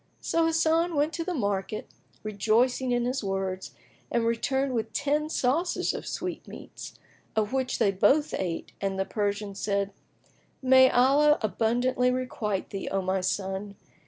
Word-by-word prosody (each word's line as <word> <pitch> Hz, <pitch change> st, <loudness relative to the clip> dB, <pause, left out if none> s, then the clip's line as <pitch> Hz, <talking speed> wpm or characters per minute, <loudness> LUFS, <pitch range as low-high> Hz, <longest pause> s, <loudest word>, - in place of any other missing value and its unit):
So 330 Hz, 0 st, +1 dB
Hasan 330 Hz, +1 st, +2 dB
went 295 Hz, +3 st, +1 dB
to 335 Hz, -, -2 dB
the 360 Hz, +1 st, -3 dB
market, 205 Hz, -3 st, -2 dB, 0.4 s
rejoicing 230 Hz, +5 st, +1 dB
in 240 Hz, 0 st, +1 dB
his 255 Hz, 0 st, -2 dB
words, 195 Hz, -1 st, -3 dB, 0.4 s
and 235 Hz, -1 st, +1 dB
returned 265 Hz, +4 st, 0 dB
with 225 Hz, -2 st, -2 dB
ten 295 Hz, +2 st, 0 dB
saucers[FN#19] 320 Hz, +5 st, 0 dB
of -, -, -6 dB
sweetmeats, -, -, -7 dB, 0.4 s
of 215 Hz, +1 st, 0 dB
which 260 Hz, -1 st, 0 dB
they 200 Hz, -, +3 dB
both 265 Hz, +11 st, +3 dB
ate 175 Hz, -3 st, -3 dB
and 195 Hz, -1 st, -1 dB
the 195 Hz, -, 0 dB
Persian 205 Hz, -1 st, -2 dB
said, 200 Hz, 0 st, -1 dB, 0.7 s
"May 260 Hz, 0 st, +6 dB
Allah 285 Hz, +4 st, +4 dB
abundantly 240 Hz, +5 st, +1 dB
requite 235 Hz, -6 st, -2 dB
thee, 195 Hz, -, -4 dB
O 195 Hz, -1 st, -1 dB
my 190 Hz, +1 st, 0 dB
son! 195 Hz, +2 st, -2 dB
235 Hz, 145 wpm, -27 LUFS, 200-270 Hz, 0.7 s, May